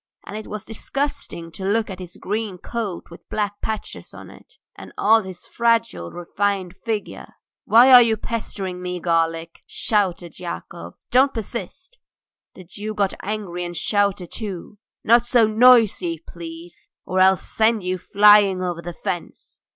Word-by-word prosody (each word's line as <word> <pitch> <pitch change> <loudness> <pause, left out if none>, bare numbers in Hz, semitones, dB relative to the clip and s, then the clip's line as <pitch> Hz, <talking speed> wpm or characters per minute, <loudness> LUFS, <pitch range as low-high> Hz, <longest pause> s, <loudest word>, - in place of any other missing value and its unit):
And 200 - -8
it 215 - -7
was 210 -1 -7
disgusting 225 - -4
to 190 - -8
look 215 +3 +1
at 190 -2 -8
his 180 -1 -10
green 210 -2 -3
coat 205 -4 -5
with 170 - -14
black 205 -1 -3
patches 220 -1 -6
on - - -11
it, - - -17 0.2
and - - -11
all 225 +2 +4
his 185 -3 -10
fragile, 230 - 0
refined 190 - -2
figure. 220 -3 -5 0.3
"Why 245 +4 +7
are 250 - +11
you 225 -2 +2
pestering 195 -6 -5
me, 180 0 -4
garlic?" 165 -1 -1
shouted 185 -6 -1
Yakov. 175 -1 -7 0.2
"Don't 265 +2 +4
persist!" 235 - -7 0.6
The 185 - -11
Jew 210 +4 -7
got 200 -2 0
angry 195 -4 -4
and 175 -1 -6
shouted 200 -4 0
too: 205 -1 -7 0.2
"Not 235 +1 +5
so 240 -2 +4
noisy, 220 -6 +4
please, 170 0 -11 0.2
or 185 - -1
I'll 190 0 +6
send 220 +1 0
you 185 0 -2
flying 200 -1 +5
over 175 -2 -3
the 175 0 -7
fence!" 175 -2 -6
200 Hz, 150 wpm, -22 LUFS, 175-220 Hz, 0.6 s, are